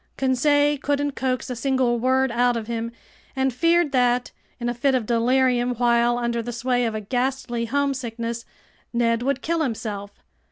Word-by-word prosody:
Conseil 290 +2 +2
couldn't 285 0 0
coax 255 -2 -2
a - - -3
single 255 -1 +1
word 260 +1 +2
out 245 0 +2
of 225 - -4
him 230 0 -3 0.4
and 265 -1 +1
feared 335 +3 +2
that, 245 -2 +2 0.3
in 240 - -3
a 240 - 0
fit 265 +3 +1
of 245 -4 0
delirium 245 +1 +2
while 240 0 +3
under 235 -1 -1
the 240 +1 -5
sway 245 +1 0
of 225 -1 -2
a 215 - -3
ghastly 245 +1 -2
homesickness, 235 -3 -2 0.5
Ned 230 -1 +1
would 265 +1 -1
kill 335 0 0
himself. 215 -6 -3
245 Hz, 165 wpm, -23 LUFS, 235-265 Hz, 0.5 s, while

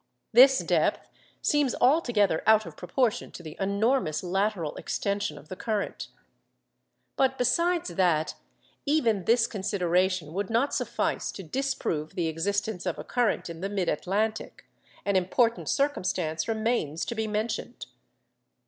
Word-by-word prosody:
This 260 +3 +8
depth - - 0 0.3
seems 290 -4 +2
altogether 240 - +3
out 220 -1 +5
of - - -9
proportion 250 -5 -1
to 175 - -9
the 155 -1 -8
enormous 200 - +1
lateral 190 -3 -1
extension 200 -3 -2
of 145 +1 -13
the 185 - -7
current. 215 0 -3 1.1
But 265 0 +2
besides 335 - +1
that 170 -3 +1 0.5
even 230 - +2
this 230 +2 +4
consideration 185 -4 0
would 195 +1 -2
not 235 +5 +1
suffice - - -1
to 195 - -8
disprove 185 - -2
the 175 -3 0
existence 195 +4 -2
of 175 - -1
a - - -6
current 245 -3 0
in 165 -1 -8
the 195 - -2
mid 195 -4 -1
Atlantic, 210 +7 -2 0.4
an 200 -1 +1
important 230 +6 +1
circumstance 185 - 0
remains 220 -8 -1
to - - -3
be 220 -1 -2
mentioned. 215 +2 -3
205 Hz, 135 wpm, -27 LUFS, 180-240 Hz, 1.1 s, This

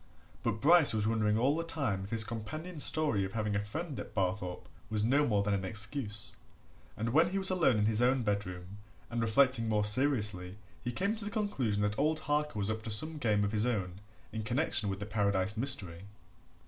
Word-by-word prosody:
But 110 - -2
Bryce 155 -5 +5
was 105 -1 0
wondering 110 -1 +1
all 135 +6 +2
the 165 - -2
time 130 -13 -2
if - - -10
his 115 0 +4
companion's 150 +10 -4
story 150 -11 +3
of 95 0 -5
having 105 -2 -2
a - - +1
friend 145 +8 -6
at - - -9
Barthorpe 90 -2 -2 0.2
was 105 -1 -1
no 140 +6 +2
more 105 -3 +1
than 105 0 0
an 95 -1 -1
excuse, 105 +2 -2 0.6
and 115 +2 -2
when 160 +8 +3
he 195 - -3
was 190 -1 +2
alone 165 -10 +2
in 105 - +1
his 110 +1 +2
own 125 +1 +2
bedroom 100 -2 -4 0.3
and 120 0 -2
reflecting 115 +1 +2
more 105 -1 +1
seriously 105 -6 +3 0.3
he 120 - -3
came 200 - -1
to 220 - -5
the 205 - -4
conclusion 135 - -1
that 105 +2 -1
old 155 +2 +1
Harker 150 -3 -1
was 105 +1 -1
up 110 0 -4
to 110 - -7
some 155 +9 +2
game 105 -5 +1
of 100 - -1
his 110 +2 0
own 95 -6 -3 0.3
in 110 0 -4
connection 115 -2 +1
with 95 0 -4
the 100 - -5
Paradise 100 -1 0
mystery. 100 -8 -1
110 Hz, 210 wpm, -31 LUFS, 105-140 Hz, 0.6 s, Bryce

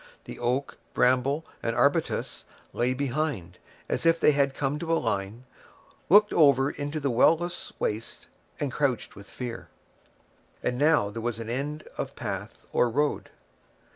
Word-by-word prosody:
The - - -9
oak, 125 +3 -1 0.2
bramble, 130 +5 +2 0.2
and 115 0 -1
arbutus 140 +6 0 0.3
lay 125 +2 +1
behind, 130 - -2 0.3
as - - -1
if 165 0 +4
they - - +5
had 140 -1 +1
come 145 +1 -1
to 165 0 -3
a 165 - +4
line, 105 +1 -2 0.7
looked 210 +1 +6
over 140 -3 +5
into 145 +2 -4
the 140 -2 0
well 125 +7 +5
less 175 +1 -5
waste 110 +2 -3 0.3
and 145 -3 -1
crouched 135 -4 -1
with 100 0 -12
fear. 120 -2 -6 1.0
And 125 - -1
now 145 -9 +3
there 115 +2 -5
was 115 -1 -2
an 115 0 -5
end 145 +4 -3 0.2
of - - -4
path - - -6
or 120 - +3
road. 145 +5 0
135 Hz, 155 wpm, -27 LUFS, 120-150 Hz, 1.0 s, looked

